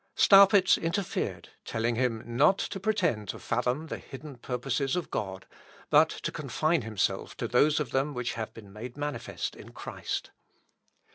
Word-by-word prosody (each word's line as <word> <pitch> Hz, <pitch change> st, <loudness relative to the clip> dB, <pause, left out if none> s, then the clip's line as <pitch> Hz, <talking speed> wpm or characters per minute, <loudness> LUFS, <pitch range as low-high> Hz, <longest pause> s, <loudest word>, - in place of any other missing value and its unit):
Staupitz 195 Hz, -1 st, +7 dB
interfered, 170 Hz, +3 st, -2 dB
telling 115 Hz, +1 st, -1 dB
him 115 Hz, -2 st, 0 dB
not 140 Hz, -, +3 dB
to 195 Hz, -, -3 dB
pretend 180 Hz, -, 0 dB
to -, -, -3 dB
fathom 130 Hz, +6 st, -1 dB
the -, -, -5 dB
hidden 145 Hz, +1 st, -10 dB
purposes 125 Hz, +3 st, -2 dB
of 180 Hz, -, -3 dB
God, 95 Hz, -2 st, -4 dB, 0.5 s
but -, -, +6 dB
to -, -, -4 dB
confine 155 Hz, 0 st, 0 dB
himself 110 Hz, -3 st, -2 dB
to -, -, -2 dB
those 145 Hz, +6 st, +3 dB
of 145 Hz, -6 st, -3 dB
them 135 Hz, +2 st, 0 dB
which 125 Hz, -1 st, -2 dB
have 110 Hz, -1 st, -4 dB
been 100 Hz, -3 st, -13 dB
made 120 Hz, +5 st, -8 dB
manifest 145 Hz, 0 st, -4 dB
in -, -, -12 dB
Christ. -, -, -5 dB
135 Hz, 155 wpm, -29 LUFS, 115-165 Hz, 0.5 s, Staupitz